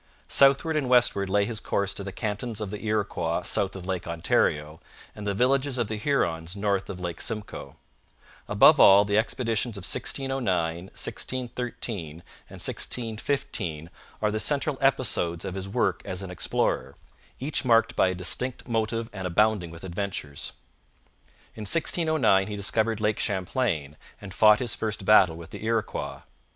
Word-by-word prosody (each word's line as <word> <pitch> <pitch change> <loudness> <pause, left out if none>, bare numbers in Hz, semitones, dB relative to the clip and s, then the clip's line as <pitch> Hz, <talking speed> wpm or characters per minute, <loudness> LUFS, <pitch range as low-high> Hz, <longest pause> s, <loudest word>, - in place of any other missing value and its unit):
Southward 140 +4 +4
and 140 -4 0
westward 120 -6 +3
lay 100 +1 +2
his 110 0 -2
course 100 0 -1
to 100 - -6
the 100 - -6
cantons 105 +2 -3
of 105 -3 -4
the 105 0 -6
Iroquois 100 -6 -1
south 100 -1 0
of 95 -2 -8
Lake 95 -2 -3
Ontario 80 -2 0 0.4
and 105 -1 -7
the 100 - 0
villages 130 +3 +1
of 120 -4 -1
the 110 - -3
Hurons 85 - -1
north 100 -1 -1
of 90 - -6
Lake 85 -2 -5
Simcoe. 105 -10 -4 0.7
Above - - +6
all, 100 +1 +8
the 105 +1 +2
expeditions 115 -1 -1
of 100 - -8
1609, 105 -11 -1
1613, 120 -5 -4
and - - -12 0.3
1615 110 - -3 0.3
are 105 - +2
the 110 - -1
central 145 +2 0
episodes 110 -11 +1
of 95 - -4
his 95 0 -5
work - - 0
as 95 +1 -5
an 95 - -7
explorer, 70 -6 -1 0.4
each 145 +3 -1
marked 115 -3 +3
by - - +4
a 95 - -1
distinct 125 +9 0
motive 115 -1 -1
and 95 -3 -4
abounding 105 0 +2
with 85 +1 -12
adventures. 90 -6 -5 1.0
In 110 - -10
1609 155 - +2
he 105 - -5
discovered 110 +2 0
Lake 105 0 0
Champlain 90 - -1 0.2
and 100 -2 -9
fought 105 +1 +6
his 120 -2 -1
first 105 -3 -3
battle 95 -6 +6
with 85 0 -11
the - - -8
Iroquois. 115 -1 -2
105 Hz, 155 wpm, -26 LUFS, 90-115 Hz, 1.0 s, all